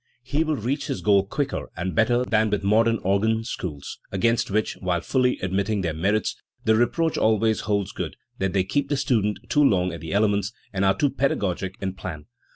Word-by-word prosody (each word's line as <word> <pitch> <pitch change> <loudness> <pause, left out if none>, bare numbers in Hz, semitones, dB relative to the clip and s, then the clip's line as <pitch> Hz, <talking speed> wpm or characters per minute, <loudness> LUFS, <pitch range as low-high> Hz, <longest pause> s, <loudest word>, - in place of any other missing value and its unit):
He 140 +5 0
will 155 -1 0
reach 135 +4 -2
his 90 - -3
goal 100 +1 +3
quicker 140 +4 -2
and 90 +2 -2
better 120 +2 +2
than 110 -2 +2
with 105 -1 -1
modern 115 +3 +3
organ 110 +4 +1
schools, 85 - -6
against 115 +5 +1
which 105 +2 0
while 90 -2 -1
fully 125 +3 +1
admitting 100 +3 0
their 85 -3 -1
merits 100 +7 0 0.3
the 110 - +4
reproach 160 +8 +1
always 110 0 +2
holds 100 -3 -1
good - - -5 0.2
that 95 -1 0
they 95 -2 +2
keep 140 +9 -1
the 145 - +1
student 110 -6 +1
too 145 - +3
long 90 -8 +3
at 85 - -7
the 80 - -6
elements, 100 0 +1 0.2
and 95 0 0
are 95 - +3
too 145 -3 +2
pedagogic 95 -9 -1
in 95 -1 -2
plan. 80 -5 -7
105 Hz, 195 wpm, -24 LUFS, 95-120 Hz, 0.3 s, the